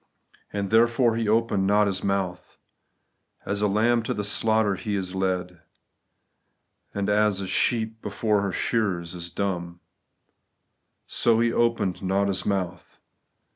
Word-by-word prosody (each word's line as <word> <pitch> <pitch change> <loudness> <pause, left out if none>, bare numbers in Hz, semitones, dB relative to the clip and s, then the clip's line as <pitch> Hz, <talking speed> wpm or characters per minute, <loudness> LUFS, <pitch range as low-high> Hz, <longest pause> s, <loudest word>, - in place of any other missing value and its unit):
And 100 -1 -3
(therefore) 115 +1 +4
He 115 -2 -1
opened 110 -3 +2
not 105 +1 +4
His 95 -2 -2
mouth. 95 -2 -2 0.9
As 100 0 -2
a 105 - +3
lamb 115 +4 +2
to 110 - -3
the 105 - -3
slaughter 110 0 +2
He 100 +2 -3
is 95 -2 -3
led; 90 -2 -2 1.3
And 100 -1 -2
as 105 -1 +2
a 100 - -3
sheep 110 +2 0
before 105 0 0
her 100 -1 -1
shearers 90 -5 -1
is 85 -1 -7
dumb, 85 -3 -3 1.3
So 115 -1 +2
He 115 0 +2
opened 115 -6 0
not 95 +1 +1
His 95 - -1
mouth. 95 -4 -3
100 Hz, 135 wpm, -25 LUFS, 95-110 Hz, 1.3 s, therefore